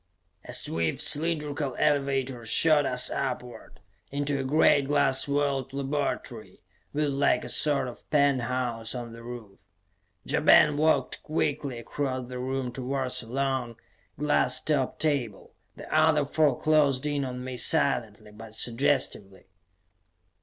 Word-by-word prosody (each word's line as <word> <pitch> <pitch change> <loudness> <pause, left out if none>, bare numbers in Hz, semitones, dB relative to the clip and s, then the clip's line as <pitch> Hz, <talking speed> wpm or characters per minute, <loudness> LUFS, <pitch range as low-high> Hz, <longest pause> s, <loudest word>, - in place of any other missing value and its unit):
A - - -8
swift, 80 0 0
cylindrical 150 -3 0
elevator 135 -3 0
shot 145 +6 +3
us 125 0 +3
upward, 125 -2 -5 0.3
into 140 0 -2
a - - -2
great 145 0 +3
glass 140 -2 +3
walled 140 -2 -1
laboratory, 140 +1 -4 0.3
built 150 -1 -1
like 140 +1 +1
a - - -7
sort 145 -3 +2
of 120 - -12
penthouse 125 -5 0
on 120 -2 -6
the 115 - -11
roof. 115 -5 -10 0.6
Ja - - 0
Ben 150 -1 +5
walked 155 +2 +1
quickly 145 -4 -2
across 130 +1 -4
the 125 0 -6
room 130 0 -3
towards 130 +1 -2
a 115 - -11
long, 130 -1 -2 0.4
glass 150 0 +2
topped 140 -4 -1
table; 140 -9 -2 0.2
the - - -11
other 155 -2 +3
four 145 -2 +1
closed 150 -3 +2
in 145 -1 -1
on 125 -1 -5
me 130 0 -6
silently 120 -7 0
but 110 +1 -12
suggestively. 115 -5 -1
135 Hz, 130 wpm, -27 LUFS, 125-145 Hz, 0.6 s, Ben